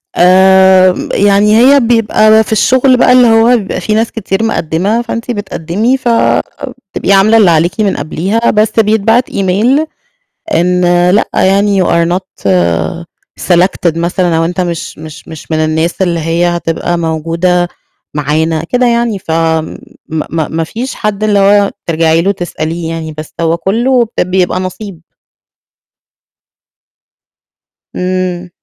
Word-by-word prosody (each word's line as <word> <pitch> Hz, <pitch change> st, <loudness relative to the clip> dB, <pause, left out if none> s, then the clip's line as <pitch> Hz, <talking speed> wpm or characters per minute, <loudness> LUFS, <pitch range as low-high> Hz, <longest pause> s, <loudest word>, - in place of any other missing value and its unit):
آمم، 190 Hz, 0 st, +4 dB
يعني 205 Hz, +2 st, +3 dB
هي 275 Hz, +4 st, +5 dB
بيبقى 220 Hz, -2 st, +3 dB
في -, -, -10 dB
الشغل 255 Hz, +3 st, +3 dB
بقى 250 Hz, -, +3 dB
اللي 250 Hz, -1 st, +5 dB
هو 225 Hz, +2 st, +4 dB
بيبقى 200 Hz, -4 st, -5 dB
في 215 Hz, -, -2 dB
ناس 225 Hz, +1 st, 0 dB
كتير 215 Hz, -2 st, -3 dB
مقدّمة، 195 Hz, +2 st, -1 dB
فأنتِ 230 Hz, 0 st, -5 dB
بتقدّمي 205 Hz, +3 st, -2 dB
ف 255 Hz, -, -7 dB, 0.9 s
بتبقي 200 Hz, -, -1 dB
عاملة 200 Hz, +3 st, +4 dB
اللي 205 Hz, -6 st, +4 dB
عليكِ 170 Hz, +6 st, 0 dB
من 200 Hz, -2 st, 0 dB
قبليها، 185 Hz, +10 st, -1 dB
بس 215 Hz, 0 st, +1 dB
بيتبعت 220 Hz, +3 st, +1 dB
email، 215 Hz, +11 st, 0 dB, 0.7 s
إن 180 Hz, +1 st, +1 dB, 0.3 s
لأ 205 Hz, -, +1 dB
يعني 195 Hz, 0 st, +2 dB
you -, -, 0 dB
are 170 Hz, 0 st, +1 dB
not 180 Hz, -, -3 dB, 0.9 s
selected 175 Hz, -2 st, +1 dB
مثلًا، 175 Hz, 0 st, 0 dB
أو 165 Hz, -, +1 dB
أنت 180 Hz, +2 st, -3 dB
مش 170 Hz, -2 st, -4 dB
مش 155 Hz, -1 st, -11 dB
مش 160 Hz, 0 st, -11 dB
من 155 Hz, -, 0 dB
الناس 160 Hz, +3 st, -1 dB
اللي 170 Hz, -2 st, -1 dB
هي 165 Hz, +2 st, 0 dB
هتبقى 175 Hz, 0 st, -2 dB
موجودة 170 Hz, +2 st, -1 dB, 0.5 s
معانا، 155 Hz, +2 st, -1 dB
كده 250 Hz, +8 st, 0 dB
يعني، 235 Hz, -3 st, 0 dB
ف 170 Hz, -, -11 dB
آمم، 160 Hz, -1 st, -1 dB, 0.3 s
م 160 Hz, -, -4 dB
م 160 Hz, -1 st, -3 dB
ما 165 Hz, -, 0 dB
فيش 240 Hz, +10 st, -6 dB
حد 210 Hz, -1 st, -3 dB
اللي 210 Hz, -1 st, +2 dB
هو 200 Hz, 0 st, +3 dB, 0.2 s
ترجعي 165 Hz, 0 st, +1 dB
له 195 Hz, -, +1 dB
تسأليه 165 Hz, -2 st, -5 dB
يعني، 160 Hz, -1 st, -6 dB
بس 155 Hz, -, -8 dB
هو 165 Hz, 0 st, 0 dB
كلّه 235 Hz, +8 st, +1 dB
ب 180 Hz, -, 0 dB
بيبقى 185 Hz, 0 st, 0 dB
نَصيب. 185 Hz, -1 st, -7 dB, 3.0 s
إمم. 180 Hz, -1 st, -3 dB
185 Hz, 145 wpm, -11 LUFS, 165-215 Hz, 3.0 s, هي